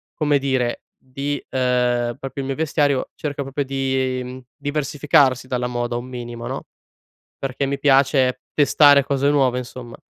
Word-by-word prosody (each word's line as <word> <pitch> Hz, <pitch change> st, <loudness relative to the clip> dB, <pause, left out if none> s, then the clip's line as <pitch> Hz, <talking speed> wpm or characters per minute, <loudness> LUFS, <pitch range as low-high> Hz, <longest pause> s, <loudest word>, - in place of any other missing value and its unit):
come 150 Hz, -2 st, +2 dB
dire 130 Hz, -3 st, -1 dB
di, 140 Hz, +2 st, -4 dB
ehm, 125 Hz, -2 st, +1 dB
proprio 135 Hz, +1 st, -5 dB
il -, -, -5 dB
mio 135 Hz, -, -1 dB
vestiario, 145 Hz, -3 st, +1 dB
cerco 145 Hz, -2 st, -4 dB
proprio 135 Hz, +1 st, -3 dB
di, 130 Hz, -1 st, -2 dB, 0.2 s
diversificarsi 145 Hz, -3 st, +1 dB
dalla 125 Hz, -1 st, -1 dB
moda 120 Hz, -1 st, -2 dB
un 120 Hz, -, -5 dB
minimo 120 Hz, -2 st, -7 dB
no? -, -, -5 dB, 0.7 s
Perché 135 Hz, 0 st, -2 dB
mi 140 Hz, +1 st, -2 dB
piace 135 Hz, -2 st, +3 dB
testare 145 Hz, -1 st, +6 dB
cose 140 Hz, 0 st, +1 dB
nuove 135 Hz, -4 st, +2 dB
insomma. 125 Hz, -1 st, -8 dB
135 Hz, 140 wpm, -21 LUFS, 125-140 Hz, 0.7 s, testare